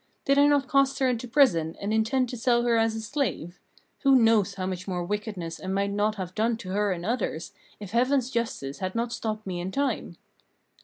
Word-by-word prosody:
Did 275 0 +4
I 285 - +6
not 285 -2 +2
cast 275 0 +2
her 270 -1 +2
into 245 -1 -1
prison, 175 - +3
and 205 +2 -2
intend 230 +4 +1
to 250 - -5
sell 240 0 +2
her 240 -1 +2
as 225 0 +2
a 220 - -4
slave? 215 - -3 0.4
Who 275 -2 +4
knows 225 -5 +4
how 185 -1 -3
much 185 0 -4
more 180 -2 -2
wickedness 205 -4 -4
I - - -6
might 200 +1 0
not 210 +1 0
have 185 -3 -6
done 225 +2 0
to 195 -5 -9
her 205 +1 +1
and 175 -1 -4
others, 210 -8 -2 0.3
if 205 -2 -8
Heaven's 255 +2 +2
justice 225 - -3
had 185 +1 -3
not 235 +1 -1
stopped 215 -1 -4
me 180 -2 -4
in 180 +2 -4
time?" 280 +6 -2
220 Hz, 215 wpm, -26 LUFS, 190-245 Hz, 0.4 s, I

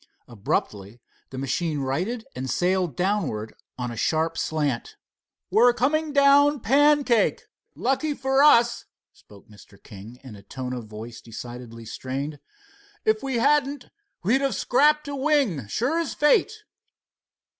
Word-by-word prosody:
Abruptly 105 -1 -3 0.3
the 130 - -9
machine 150 +4 -2
righted 180 - -3
and 130 +1 -5
sailed 180 0 0
downwards 175 - -1 0.2
on 125 -1 -4
a - - -7
sharp 160 +7 0
slant. 145 -6 -2 0.6
"We're 235 +5 +5
coming 300 +5 0
down 285 0 +4
pancake. 275 0 +3 0.3
Lucky 275 +4 -1
for 270 0 +1
us," 240 -5 +4 0.3
spoke 100 -1 -19
Mr. 105 -1 -17
King 110 +5 -12
in 125 -5 -10
a 100 - -13
tone 125 +3 -6
of 120 -3 -6
voice 110 +2 -10
decidedly 115 0 -9
strained. 135 +5 -5 0.7
"If 435 -1 +2
we 270 -2 -3
hadn't, 280 +2 +1 0.3
we 205 +7 +2
would 270 - +3
have 270 -6 0
scraped 300 +7 +2
a 285 - -4
wing, 265 - 0
sure 255 - -1
as 330 -4 -3
fate." 430 +7 +2
185 Hz, 135 wpm, -24 LUFS, -, 0.7 s, We're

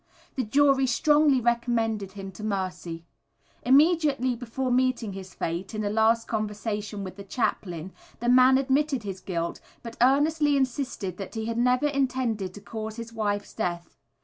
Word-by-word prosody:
The 260 - -1
jury 270 +3 +3
strongly 295 +2 +4
recommended 230 -4 0
him 195 -1 -7
to 210 - -10
mercy. 180 -5 -3 0.6
Immediately 280 -3 +3
before 250 +2 -3
meeting 250 -4 +1
his 190 -1 -9
fate, 175 +5 -4
in 215 - -2
a 205 - -1
last 225 +1 +3
conversation 210 -1 -3
with 185 0 -8
the 200 - -8
chaplain, 190 -5 -3 0.3
the 240 - -3
man 255 +1 +6
admitted 270 -1 +1
his 190 -2 -6
guilt 170 -3 -3 0.2
but 230 -1 -8
earnestly 290 +3 +3
insisted 250 - -2
that 195 +1 -7
he 220 0 -3
had 230 +1 -2
never 250 +3 +3
intended 255 -8 0
to 205 - -10
cause 220 +1 -6
his 230 0 -8
wife's 205 -2 -2
death. 175 -5 -4
230 Hz, 155 wpm, -26 LUFS, 200-260 Hz, 0.6 s, man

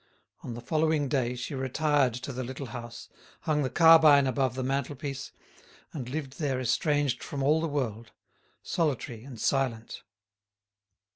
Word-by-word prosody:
On 120 - -6
the 120 - -7
following 155 +1 +1
day 125 -3 0
she 125 +4 -5
retired 135 -1 +1
to 130 +2 -6
the 130 +1 -4
little 130 +3 -6
house, 120 -2 -8 0.3
hung 150 -1 0
the 130 - 0
carbine 160 -4 +7
above 130 -1 0
the 130 - -3
mantelpiece, 135 +1 -3 0.6
and 130 -5 -5
lived 140 -1 -5
there 135 -5 0
estranged 130 +1 +1
from 140 -2 -4
all 155 +3 +3
the 165 - 0
world, 115 -6 -3 0.5
solitary 130 -8 -2
and 130 -4 -10
silent. 120 -3 -1
135 Hz, 145 wpm, -28 LUFS, 125-145 Hz, 0.6 s, carbine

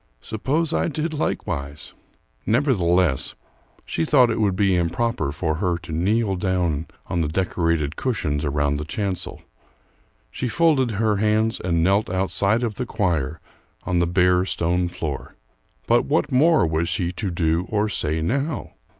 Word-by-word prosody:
Suppose 150 +9 -1
I - - +1
did 155 +1 -2
likewise?" 70 - -3 0.5
Nevertheless 95 - +2 0.5
she 80 - -1
thought 125 - +4
it 110 - -1
would 100 -3 +2
be 95 -1 +2
improper 90 - 0
for 80 +2 -2
her 90 -1 0
to 85 0 -10
kneel 100 +5 +1
down 90 -4 -1 0.2
on 85 - -1
the 80 - 0
decorated 85 -3 0
cushions 75 - -1
around 75 0 0
the 75 - -4
chancel. 95 +3 -4 0.9
She 125 - -3
folded 150 -4 +3
her 105 0 +1
hands 110 +2 +1
and 85 -2 0
knelt 100 +4 +2
outside 95 +5 +1
of 115 -3 -1
the - - -1
choir 80 - -1 0.4
on 90 -1 0
the 85 - +2
bare 90 0 +3
stone 90 -1 0
floor. 75 -6 -5 0.5
But - - +3
what - - 0
more 155 - +4
was 80 +1 0
she 85 0 -1
to 95 +2 -4
do 85 0 0
or 105 0 +1
say 80 -6 -1
now? 140 - -2
90 Hz, 150 wpm, -23 LUFS, 80-110 Hz, 0.9 s, thought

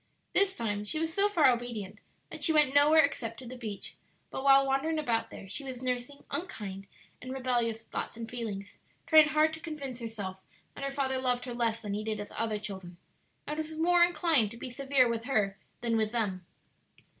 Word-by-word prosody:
This 400 -1 +3
time 205 -3 -2
she 210 +9 -2
was 325 +1 -1
so 400 +3 +3
far 335 -8 +5
obedient 235 -5 -4 0.3
that - - -7
she 325 - +5
went 300 -4 +4
nowhere 300 +2 +7
except 230 -5 -2
to 255 - -8
the 250 +2 -7
beach, 220 -5 -6 0.3
but 265 - -4
while 275 0 +7
wandering 275 +4 +1
about 240 -7 0
there 195 - -10
she 205 +9 -4
was 260 -2 -6
nursing 250 +2 -3
unkind 210 - -5 0.3
and 255 - -6
rebellious 240 -4 0
thoughts 225 - -5
and 230 -1 -5
feelings; 220 -5 -6 0.3
trying 310 -2 +7
hard 310 +1 +3
to 315 - -5
convince 290 -6 -6
herself 210 -5 -5 0.4
that - - -8
her 275 - 0
father 270 -1 -1
loved 250 -1 0
her 245 - -5
less 230 -1 0
than 205 -1 -3
he 210 +1 -2
did 215 0 -2
his 205 0 -7
other 220 -2 -1
children, 190 -4 -7 0.5
and 300 - -4
was 315 0 -4
more 345 +2 +3
inclined 320 - +3
to 230 - -10
be 250 - -6
severe 270 0 +3
with 230 0 -2
her 210 -7 +1 0.3
than 235 -1 +1
with 215 -1 +1
them. 195 -7 -2
245 Hz, 200 wpm, -30 LUFS, 220-290 Hz, 0.5 s, nowhere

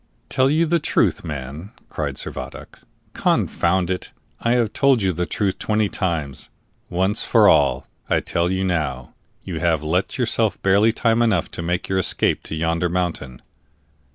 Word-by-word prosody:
"Tell 130 +1 +2
you 160 +3 +3
the 170 +1 +2
truth, - - +1
man!" 75 +5 -7
cried - - -4
Servadac. - - -7 0.3
"Confound 90 +1 +1
it, 90 - -4 0.3
I 115 - +1
have 120 -4 +1
told 140 -3 +3
you 95 -1 +1
the 90 +2 -2
truth 100 -3 -1
twenty 105 -1 0
times. 80 -8 -3 0.4
Once 95 +4 +1
for - - +4
all, - - +3 0.2
I - - +3
tell 85 +1 -1
you 95 +1 -1
now, 75 -9 -2 0.3
you - - -5
have 80 -3 +1
left 90 +10 -1
yourself 115 -3 0
barely 100 +4 +4
time 115 0 +1
enough 110 -8 +1
to - - -4
make 90 +1 -2
your 95 0 0
escape 95 - +1
to - - -4
yonder 85 +2 0
mountain." 85 -8 -3
90 Hz, 160 wpm, -21 LUFS, 85-110 Hz, 0.4 s, for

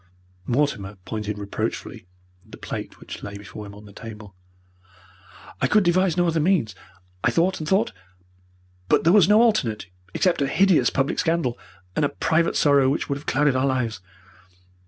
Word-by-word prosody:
Mortimer 120 -7 0
pointed 105 -1 -4
reproachfully 100 -2 -5 0.4
at - - -22
the - - -8
plate - - -7
which - - -9
lay 100 0 -7
before 105 +1 -9
him 100 - -11
on 105 +1 -13
the 100 - -14
table. 105 -2 -10 1.3
"I - - +3
could 210 -1 +4
devise 180 0 +2
no 175 - +3
other 165 -1 +1
means. 155 - +1 0.5
I - - +4
thought 180 +3 +1
and 155 - -4
thought, 195 - +2 1.0
but - - +3
there 170 - +4
was 200 -4 +6
no 215 +2 +6
alternate 125 - +1 0.3
except 180 -5 +2
a 140 - +2
hideous 190 +4 +3
public 135 0 -1
scandal, 165 -8 0 0.4
and - - +1
a 145 - +2
private 165 +1 +1
sorrow 140 -2 +4
which 145 - -2
would 140 - -1
have 145 - -17
clouded 145 -1 +2
our 130 +1 +2
lives. 120 -6 -1
140 Hz, 175 wpm, -23 LUFS, 110-170 Hz, 1.3 s, was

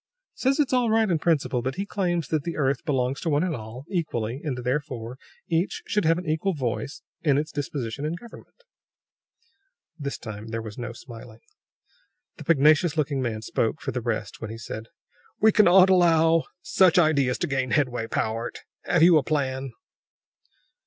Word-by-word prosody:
"Says 270 +3 0
it's 280 -3 +2
all 250 -2 +3
right 220 -2 +3
in 165 - +1
principle; 145 -6 +1
but 130 +2 -3
he 195 - -3
claims 175 -6 -1
that 155 -3 0
the 170 - -4
earth 135 -3 0
belongs 135 -3 0
to 165 - -1
one 150 +1 +2
and 180 -4 -1
all, 115 +4 -9
equally, 135 - -2
and 140 -6 -3
therefore 125 -2 -3 0.3
each 170 +3 -1
should 210 -3 0
have 165 +1 +4
an 180 - -5
equal 160 +4 0
voice 135 +1 -3 0.2
in 145 -4 +3
its 155 +2 -2
disposition 140 -3 -4
and 160 +3 -3
government." 240 - -15 1.4
This 140 -1 -4
time 110 -1 -8
there 115 0 -3
was 105 -2 -8
no 120 -2 -5
smiling. 115 -1 -12 1.0
The - - -9
pugnacious 155 +1 +4
looking 140 -3 0
man 110 -3 -3
spoke 115 +6 -1
for - - -4
the 125 - -3
rest 115 -2 -3
when 110 - -5
he 115 - -7
said: 110 0 -7 0.5
"We 220 +1 +6
cannot 190 -2 +6
allow 165 -2 +4 0.2
such 185 -3 +4
ideas 140 -7 +3
to - - -1
gain 135 -2 -1
headway, 125 -5 0
Powart! 115 +1 -3 0.2
Have 170 -2 +3
you 170 -2 +7
a - - -3
plan?" 135 -2 -2
145 Hz, 175 wpm, -25 LUFS, 125-170 Hz, 1.4 s, you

